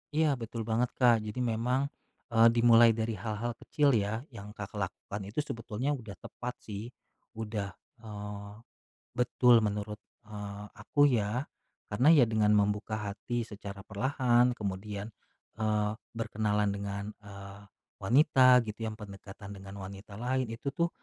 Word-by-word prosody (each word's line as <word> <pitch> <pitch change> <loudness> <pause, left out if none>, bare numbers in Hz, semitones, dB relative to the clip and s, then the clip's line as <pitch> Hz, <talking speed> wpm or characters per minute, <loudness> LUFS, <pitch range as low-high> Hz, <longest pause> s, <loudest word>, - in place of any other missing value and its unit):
Iya, 160 0 +4
betul 115 -1 -5
banget, 120 +2 +1
Kak. 120 -3 +5
Jadi, 105 +3 -5
memang, 125 +3 +1 0.5
eee, 115 +1 +8
dimulai 115 0 +7
dari 110 0 -1
hal-hal 110 +4 -3
kecil, 145 -2 +2
ya. 105 +2 0
Yang 105 -7 -10
Kakak 105 +1 -6
lakukan 100 +1 -8
itu 105 +8 -5
sebetulnya 130 0 -2
udah 110 -5 -9
tepat, 125 0 -6
sih. 105 +3 -7 0.4
Udah, 105 -3 -4 0.3
eee, 105 -1 -7 0.6
betul 125 -1 +5
menurut, 105 0 -2 0.2
eee, 105 -1 -7
aku, 145 -1 +2
ya. 115 +4 0 0.5
Karena, 125 +8 +4
ya, 145 -7 +8
dengan 110 -2 +3
membuka 105 +1 +1
hati 115 +4 -3
secara 100 -2 -9
perlahan, 125 +2 +2
kemudian, 100 +1 -4 0.5
eee, 105 -1 +1 0.2
berkenalan 105 -2 0
dengan, 100 0 -4 0.2
eee, 100 -1 -10 0.4
wanita, 130 +2 +6
gitu, 105 0 -7
yang 110 - -6
pendekatan 100 -1 -10
dengan 95 0 -9
wanita 100 +1 -9
lain, 125 +2 -1
itu, 120 +5 -4
tuh, 170 0 +1
110 Hz, 135 wpm, -30 LUFS, 100-120 Hz, 0.6 s, eee